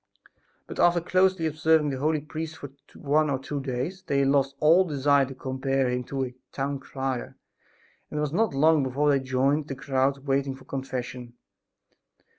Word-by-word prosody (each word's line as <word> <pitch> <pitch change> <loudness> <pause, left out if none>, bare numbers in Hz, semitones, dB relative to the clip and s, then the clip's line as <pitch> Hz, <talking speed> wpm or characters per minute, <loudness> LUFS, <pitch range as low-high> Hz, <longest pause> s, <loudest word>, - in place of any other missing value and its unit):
But, - - -9
after 175 0 +4
closely 185 0 +2
observing 155 -1 +2
the 135 - -4
holy 155 +1 +1
priest 155 +1 -6
for 140 -1 -9 0.2
one 150 +1 +1
or 135 - +1
two 140 +2 -5
days, 135 +8 -4
they 140 -6 +1
lost 135 0 +2
all 165 +5 +6
desire 140 -4 +2
to 135 - -9
compare 130 0 -1
him 125 0 -1
to 135 0 -2
a 125 - -8 0.2
"town 140 0 -3
crier," 135 -2 -4 0.7
and 150 - -5
it - - 0
was 150 0 -2
not 215 -4 +1
long 155 +2 +4
before 140 +3 +1
they 140 - +3
joined 135 +3 0
the 135 - -5
crowds 135 0 0
waiting 135 0 -1
for 130 - -16
confession. 125 -2 -5
140 Hz, 175 wpm, -26 LUFS, 135-155 Hz, 0.7 s, all